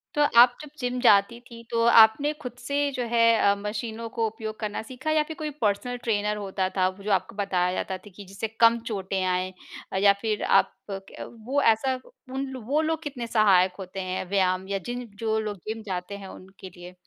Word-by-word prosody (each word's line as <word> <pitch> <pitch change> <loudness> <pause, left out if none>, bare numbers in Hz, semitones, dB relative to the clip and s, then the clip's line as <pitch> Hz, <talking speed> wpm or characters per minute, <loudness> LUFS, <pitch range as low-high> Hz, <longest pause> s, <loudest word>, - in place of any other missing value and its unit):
तो 295 - +2 0.2
आप 245 0 +6
जब 300 - -10
जिम 250 -1 -2
जाती 210 0 +4
थी 230 -1 -11
तो 230 -1 +1
आपने 230 +5 +6
खुद 250 -3 -5
से 280 +4 -2
जो 255 -2 -3
है 230 -1 +4 0.3
अ, - - +1
मशीनों 220 +3 -5
को 225 0 -1
उपयोग 220 0 -7
करना 210 -2 -3
सीखा 260 +6 -4
या 310 -1 +3
फिर 315 +1 -8
कोई 305 -1 -3
पर्सनल 225 +4 0
ट्रेनर 210 -2 0
होता 190 -2 -2
था 185 0 +3
जो 205 +1 -3
आपको 195 - 0
बताया 185 -3 0
जाता 190 0 -3
था 195 +3 -15
कि 205 - -10
जिससे 195 +3 -5
कम 230 0 +6
चोटें 195 -3 -2
आएँ? 185 0 -1 0.5
या 200 0 +6
फिर 215 -2 -1
आप - - +4 0.2
क 195 +4 -8
वो 280 +4 +1
ऐसा 225 +2 +3 0.4
उन 270 +1 -2
लो 260 - -6
वो 290 +6 +1
लोग 320 0 -1
कितने 270 -6 -5
सहायक 195 -5 +4
होते 190 0 -7
हैं 185 0 -3
व्यायाम 190 -1 +1
या 200 0 -1
जिन 245 0 -4
जो 220 -1 0
लोग 210 -2 -4
जिम 220 +1 -4
जाते 185 +1 -4
हैं 195 -1 -9
उनके 190 0 -12
लिए? 175 0 -12
215 Hz, 205 wpm, -26 LUFS, 195-245 Hz, 0.5 s, आप